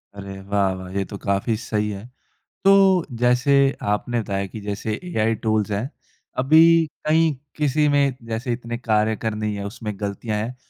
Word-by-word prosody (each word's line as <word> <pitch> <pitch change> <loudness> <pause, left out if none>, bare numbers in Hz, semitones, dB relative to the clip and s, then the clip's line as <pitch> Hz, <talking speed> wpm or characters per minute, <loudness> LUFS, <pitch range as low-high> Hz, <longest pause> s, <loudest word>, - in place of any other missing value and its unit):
अरे, 100 -1 -8
वाह-वाह! 95 -2 -1
ये 100 - +1
तो 100 - -8
काफ़ी 100 +3 0
सही 105 -2 -2
है। 100 +1 -6 0.6
तो, 195 -2 +5
जैसे 125 +3 +2 0.4
आपने 120 +3 -1
बताया 100 -2 -2
कि 110 - -8
जैसे 105 +2 -3
एआई 115 -11 0
टूल्स 110 -1 +1
हैं, 105 +6 -2 0.5
अभी 150 +5 +5 0.4
कहीं 160 0 +3 0.2
किसी 150 0 +2
में 140 -2 +2
जैसे 115 +2 -2
इतने 120 0 -5
कार्य 110 -2 +1
करने 110 -1 -3
ही 105 - -2
है 100 0 -5
उसमें 105 +1 -5
ग़लतियाँ 105 +1 -3
हैं 115 +4 -3
110 Hz, 165 wpm, -22 LUFS, 100-125 Hz, 0.6 s, तो